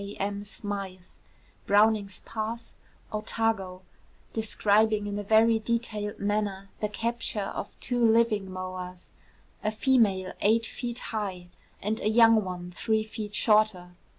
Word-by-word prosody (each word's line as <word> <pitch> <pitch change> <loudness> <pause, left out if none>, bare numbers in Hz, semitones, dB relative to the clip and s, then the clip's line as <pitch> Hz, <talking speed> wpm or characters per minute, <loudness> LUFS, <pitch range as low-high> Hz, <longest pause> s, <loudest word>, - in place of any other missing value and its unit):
K. 200 +1 -7
M. 200 +1 -3
Smythe, 200 -3 -5 0.6
Browning's 205 -1 +3
Pass, 225 +1 -5 0.4
Otago, 215 -4 -1 0.5
describing 215 -1 +2
in 205 0 -3
a - - -4
very 220 +2 +4
detailed 215 -2 -2
manner 200 -1 -1
the 210 - -1
capture 225 -2 -2
of - - -6
two 245 -1 -1
living 225 -3 +3
moas, 185 -1 -7 0.5
a 215 - +2
female 215 -6 +2
eight 225 +2 +3
feet 240 0 -5 0.2
high, 190 -5 -3 0.3
and 215 +2 -1
a 215 - +1
young 225 -1 +6
one 180 -1 -6
three 220 +4 0
feet 215 -1 -6
shorter. 210 -5 +3
210 Hz, 125 wpm, -28 LUFS, 195-225 Hz, 0.6 s, young